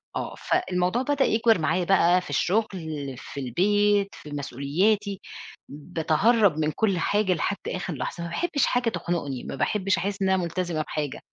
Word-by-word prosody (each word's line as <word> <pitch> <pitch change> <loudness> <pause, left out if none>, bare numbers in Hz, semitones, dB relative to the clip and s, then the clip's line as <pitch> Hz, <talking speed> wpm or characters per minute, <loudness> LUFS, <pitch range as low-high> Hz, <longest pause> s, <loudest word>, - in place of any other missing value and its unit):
آه، - - -4
فالموضوع 200 - 0
بدأ 280 0 +1
يكبر 225 -2 +3
معايا 165 +3 +1
بقى 180 -1 +4
في 180 - -11
الشغل، 200 +10 +1 0.5
في 140 - -8
البيت، 205 - +2
في 150 - -11
مسؤولياتي، 180 - 0 0.5
باتهرب 165 - +2
من 155 0 +1
كل 200 -1 +1
حاجة 205 +1 +2
لحد 200 +4 -1
آخر 185 - -3
لحظة، 170 - -4
ما 170 - -4
باحبش 300 - 0
حاجة 245 -2 +1
تخنقني، 165 - -3
ما - - -6
باحبش 195 +7 +1
أحس 200 +3 -3
إن 190 - +2
أنا 190 - +3
ملتزمة 170 -2 -2
بحاجة، 150 -2 -4
185 Hz, 160 wpm, -25 LUFS, 155-210 Hz, 0.5 s, بقى